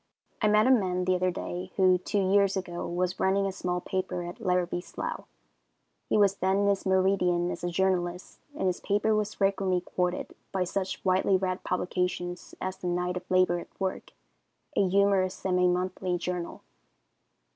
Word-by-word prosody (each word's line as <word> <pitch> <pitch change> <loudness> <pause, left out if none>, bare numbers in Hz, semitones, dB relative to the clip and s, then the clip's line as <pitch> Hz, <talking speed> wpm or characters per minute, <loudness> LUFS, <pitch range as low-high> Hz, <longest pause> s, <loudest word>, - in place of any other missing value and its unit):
I 215 - +4
met 210 +1 +5
a 260 - +5
man 185 -7 +2
the 185 - +3
other 185 0 +1
day, 180 +1 -5
who, 185 -1 +4
two 205 +3 -2
years 200 -1 +4
ago, 175 -2 -4
was 180 +1 -2
running 195 +1 +2
a 195 - -1
small 180 -1 -2
paper 185 -1 -3
at 175 +4 -7
Larrabie's 180 -1 0
Slough. - - -5 0.8
He - - +3
was 200 -1 +4
then 190 +1 +1
in 200 - +2
his 195 -1 0
meridian 185 -2 +2
as - - -6
a 175 - 0
journalist, 180 0 -1 0.2
and 300 - -2
his 180 -1 0
paper 205 +2 +1
was 210 -1 -1
frequently 195 -2 +1
quoted 180 0 -2 0.2
by 190 -1 0
such 190 +1 -3
widely 190 +1 +3
read 185 0 -2
publications 180 -1 -2
as 185 0 -4
the 180 - -5
Knight 180 +1 -1
of 180 0 -6
Labor 185 -1 +3
at - - -13
Work, 190 -1 -3 0.6
a 195 - +3
humorous 195 -1 +3
semi 180 -1 +1
monthly 180 0 -1
journal. 175 0 -4
185 Hz, 175 wpm, -28 LUFS, 180-195 Hz, 0.8 s, met